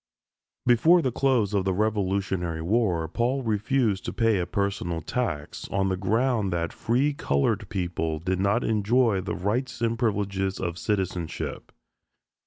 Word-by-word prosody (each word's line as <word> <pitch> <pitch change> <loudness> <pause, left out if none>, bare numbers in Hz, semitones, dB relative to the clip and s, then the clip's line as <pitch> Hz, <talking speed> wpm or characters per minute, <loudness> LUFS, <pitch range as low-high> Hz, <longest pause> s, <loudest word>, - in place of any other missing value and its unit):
Before 160 +9 +5
the 130 - +1
close 120 -6 +1
of 100 -2 +2
the 95 -1 0
Revolutionary 95 -5 -1
War, 90 -4 +1
Paul 125 - -1
refused 110 -1 +1
to - - -3
pay 115 -4 +2
a 90 - -2
personal 100 -4 -1
tax, 80 -7 -3
on 95 0 0
the 95 - +1
ground 110 +2 +1
that 85 -1 -2
free 130 +6 +1
colored 70 - 0
people 85 -3 -2
did 90 +3 -2
not 100 +5 +2
enjoy 110 -1 +2
the 95 - -3
rights 115 +9 -2
and 115 0 0
privileges 100 -4 -1
of 85 -2 -3
citizenship. 95 -5 -3
100 Hz, 145 wpm, -26 LUFS, 90-115 Hz, -, Before